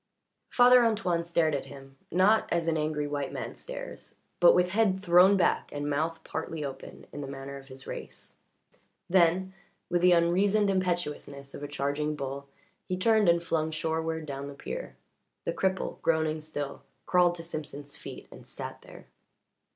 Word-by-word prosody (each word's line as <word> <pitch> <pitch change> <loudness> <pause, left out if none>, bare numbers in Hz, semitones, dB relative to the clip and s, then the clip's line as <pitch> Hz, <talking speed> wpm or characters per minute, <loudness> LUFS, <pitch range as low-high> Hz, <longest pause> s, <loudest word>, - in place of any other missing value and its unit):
Father 245 0 +7
Antoine 205 -7 +1
stared 170 -2 +1
at 140 - -2
him, 135 -1 -12 0.2
not 195 +6 +4
as 170 -1 0
an 165 - +2
angry 150 -1 -1
white 145 -2 -3
man - - -5
stares, - - -8 0.2
but 175 - +7
with 180 0 +3
head 200 -2 +2
thrown 185 +1 +6
back 185 - +1
and 145 0 -3
mouth 155 +3 0
partly 160 -1 -4
open, 135 - -8
in 145 - -5
the 140 - -5
manner 135 0 -7
of 135 0 -13
his 130 -1 -9
race. - - -8 0.7
Then, 185 +1 +3 0.4
with 175 0 +2
the 180 0 +6
unreasoned 195 +5 +3
impetuousness 170 -7 -2
of - - -8
a 145 - -4
charging 145 +2 -1
bull, 140 0 -5 0.4
he 185 - -2
turned 215 0 +4
and 170 0 +3
flung 160 -2 0
shoreward 160 0 -2
down 140 -1 -5
the 140 - -8
pier. - - -6 0.5
The - - -1
cripple, 190 0 -1
groaning 160 -1 +1
still, 145 -2 -5 0.2
crawled 180 -1 +4
to 165 - -8
Simpson's 150 -3 -7
feet - - -9
and - - -13
sat - - -7
there. - - -14
165 Hz, 165 wpm, -29 LUFS, 145-180 Hz, 0.7 s, Father